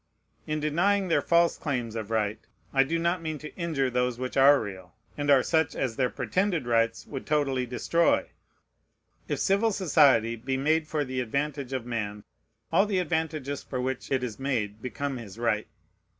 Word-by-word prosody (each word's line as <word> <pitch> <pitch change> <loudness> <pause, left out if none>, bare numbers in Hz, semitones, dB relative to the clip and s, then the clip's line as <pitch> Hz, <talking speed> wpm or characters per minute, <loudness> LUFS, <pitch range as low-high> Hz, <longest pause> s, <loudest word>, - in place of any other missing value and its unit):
In 155 0 -1
denying 185 +6 +1
their - - +3
false 170 0 +3
claims 125 -7 -3
of 110 -2 -4
right, 110 -1 0 0.3
I 135 -1 +5
do 165 +5 -1
not 170 +1 0
mean 155 -2 -3
to 150 +1 -10
injure 155 -7 -1
those 125 -1 0
which 130 0 -4
are 140 +1 +7
real, 95 -2 -8 0.2
and 145 0 -2
are 135 -3 +6
such 160 -2 +1
as 125 -4 -2
their 125 0 +1
pretended 185 -7 -1
rights 115 -1 +1
would 135 -3 -7
totally 135 -4 +1
destroy. 165 +7 +1 1.0
If - - -1
civil 205 +3 +2
society 140 - +4
be 130 +4 -3
made 155 +3 +1
for 150 -2 -1
the 130 0 -3
advantage 140 +2 -2
of 130 -3 -3
man, 105 -4 -4 0.5
all 195 +5 +4
the 200 -2 0
advantages 160 -5 -2
for 130 - -5
which 130 0 -3
it 130 -2 +1
is 120 -2 -5
made 110 -6 -2
become 135 +2 -3
his 110 -4 -9
right. 115 -3 0
135 Hz, 180 wpm, -27 LUFS, 120-160 Hz, 1.0 s, are